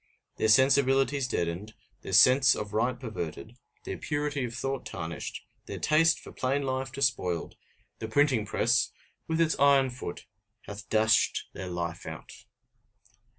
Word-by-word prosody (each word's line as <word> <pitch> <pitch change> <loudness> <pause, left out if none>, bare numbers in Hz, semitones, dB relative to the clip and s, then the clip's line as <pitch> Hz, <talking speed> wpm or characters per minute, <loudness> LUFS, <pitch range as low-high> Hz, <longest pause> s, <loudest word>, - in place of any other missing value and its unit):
Their 110 - +1
sensibilities 135 +2 +3
deadened, 90 +1 -3 0.3
their 95 - -7
sense 130 +7 +6
of 105 0 -6
right 120 +3 0
perverted, 110 - -6 0.3
their - - -6
purity 145 -3 -2
of 115 -1 -7
thought 135 +1 -3
tarnished, 85 -1 -6 0.2
their - - -6
taste 160 +2 +3
for - - -12
plain 135 +2 -1
life 130 -1 -3
despoiled 120 -10 -1 0.4
the 110 - -5
printing 130 -1 +2
press, 115 +3 +1 0.4
with 160 0 -1
its 165 -1 +2
iron 140 -2 +4
foot, 120 -8 -7 0.4
hath 100 -1 -10
dashed 110 +1 +2
their 95 0 -6
life 85 -1 -5
out! - - -8
125 Hz, 140 wpm, -28 LUFS, 105-135 Hz, 0.4 s, sense